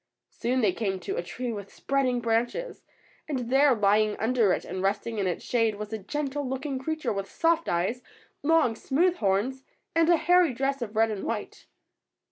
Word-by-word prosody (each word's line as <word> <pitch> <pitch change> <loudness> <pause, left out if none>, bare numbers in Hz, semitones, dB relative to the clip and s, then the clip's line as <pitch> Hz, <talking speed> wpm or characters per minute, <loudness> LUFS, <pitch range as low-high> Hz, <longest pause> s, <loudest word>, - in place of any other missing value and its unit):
Soon 255 +2 -1
they 200 -5 +3
came 190 -2 -2
to - - -3
a - - -1
tree 240 +7 -5
with 200 -2 -7
spreading 260 -3 0
branches, 235 - -1 0.5
and 250 -4 -3
there, 275 0 +5
lying 210 0 +2
under 225 -2 +2
it - - -1
and 185 +1 -4
resting 205 +3 -1
in 195 - 0
its 175 - -3
shade, 225 -3 +1
was 210 +1 -7
a 220 - -3
gentle 285 +6 -3
looking 265 +1 -3
creature 315 -1 -2
with 195 -1 -4
soft 330 0 +1
eyes, 185 +9 0 0.4
long, 305 -6 +3
smooth 345 +10 +1
horns, 215 +7 0 0.3
and 330 0 +3
a 345 - +6
hairy 350 -5 +3
dress 270 +1 -1
of 220 -2 -5
red 225 0 +3
and 205 -2 -4
white. 220 -3 -5
240 Hz, 185 wpm, -27 LUFS, 210-275 Hz, 0.5 s, a